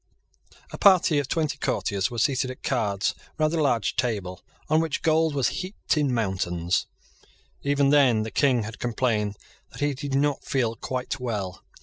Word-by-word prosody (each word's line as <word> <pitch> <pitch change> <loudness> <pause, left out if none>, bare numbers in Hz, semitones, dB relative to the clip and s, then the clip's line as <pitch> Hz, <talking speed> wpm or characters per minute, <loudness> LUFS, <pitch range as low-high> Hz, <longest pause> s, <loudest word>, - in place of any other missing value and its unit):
A - - -8
party 180 -6 +5
of 140 - -2
twenty 150 -1 -1
courtiers 100 -6 -1
was 120 -2 0
seated 130 -2 +1
at 130 - -9
cards 105 -6 0 0.2
round 155 +1 +1
a 165 - +1
large 120 -8 +1
table 105 -7 -2 0.3
on 155 +1 +3
which 165 -2 -2
gold 160 -1 +2
was 135 -4 +2
heaped 185 -1 -2
in 145 -3 +1
mountains. 95 -6 -1 0.7
Even 140 0 +2
then 130 -7 +4
the 110 - -5
King 130 -5 +2
had 110 +3 -8
complained 110 -4 -1 0.3
that - - -12
he 145 0 +1
did 140 0 -4
not 145 0 +1
feel 120 -5 0
quite 125 +2 -4
well. 105 -7 -4
130 Hz, 165 wpm, -25 LUFS, 110-145 Hz, 0.7 s, party